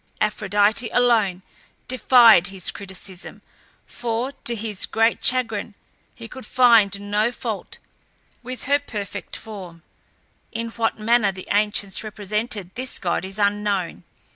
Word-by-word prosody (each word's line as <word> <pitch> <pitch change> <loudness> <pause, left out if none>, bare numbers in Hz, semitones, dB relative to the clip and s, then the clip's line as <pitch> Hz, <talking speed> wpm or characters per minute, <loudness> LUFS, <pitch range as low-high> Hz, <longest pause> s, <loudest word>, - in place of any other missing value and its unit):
Aphrodite 210 +2 +1
alone 220 -7 +2 0.4
defied 240 -7 +6
his 190 -3 -2
criticism, 190 -1 -9 0.4
for, 240 +2 -3
to 240 - +3
his 215 -3 -3
great 225 +1 +1
chagrin, 225 -5 +1 0.4
he 230 -1 -10
could 260 +3 -10
find 225 -4 +4
no 205 +3 0
fault - - -6 0.6
with 255 -1 -7
her 285 +1 +2
perfect 210 -8 -6
form. 185 -6 -9 0.7
In 230 +1 -4
what 225 -1 -1
manner 220 -1 +2
the 185 -1 -10
ancients 205 -1 +1
represented 210 -2 -3
this 255 0 -5
god 175 -1 -1
is 190 +1 -6
unknown. 205 -3 -1
215 Hz, 120 wpm, -22 LUFS, 200-235 Hz, 0.7 s, defied